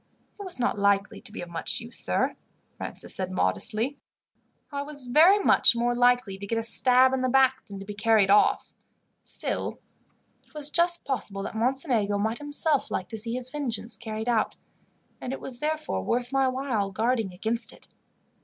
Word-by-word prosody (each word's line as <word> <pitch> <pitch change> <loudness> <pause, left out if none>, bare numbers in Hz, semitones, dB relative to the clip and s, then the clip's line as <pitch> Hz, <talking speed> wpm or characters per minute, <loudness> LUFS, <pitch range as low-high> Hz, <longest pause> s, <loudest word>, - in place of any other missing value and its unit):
"It - - -6
was 370 -7 -2
not 245 -4 -1
likely 200 0 +1
to - - -6
be - - -7
of 175 - -10
much 170 -1 -1
use, 235 +1 -4
sir," - - 0 0.4
Francis - - -7
said 185 -1 -3
modestly. 210 - 0 0.7
"I 280 0 -3
was 285 -1 -7
very 310 +11 +5
much 395 -10 +4
more 240 +1 0
likely 245 -5 +2
to 200 - -7
get 230 - -1
a 225 - -1
stab 255 +3 +5
in 265 - 0
the 255 - 0
back 265 0 +3
than 200 - -8
to 195 - -9
be 205 - -7
carried 205 -1 +3
off. 205 - +3 0.5
Still, - - -5 0.6
it - - -30
was 300 -1 -2
just 345 0 +4
possible 210 -7 -3
that - - -6
Mocenigo 235 -4 0
might 220 +3 -1
himself 290 0 +1
like 185 - -4
to 220 - -6
see 230 +2 -2
his 255 0 -4
vengeance 240 -6 -4
carried 220 -1 -6
out, 235 -3 +1 0.7
and 255 - -4
it - - -5
was 245 -2 -8
therefore 305 - -2
worth 245 - -1
my 270 -1 +2
while 255 -6 -1
guarding 225 0 -1
against 225 +5 0
it. - - -19
240 Hz, 185 wpm, -26 LUFS, 210-270 Hz, 0.7 s, very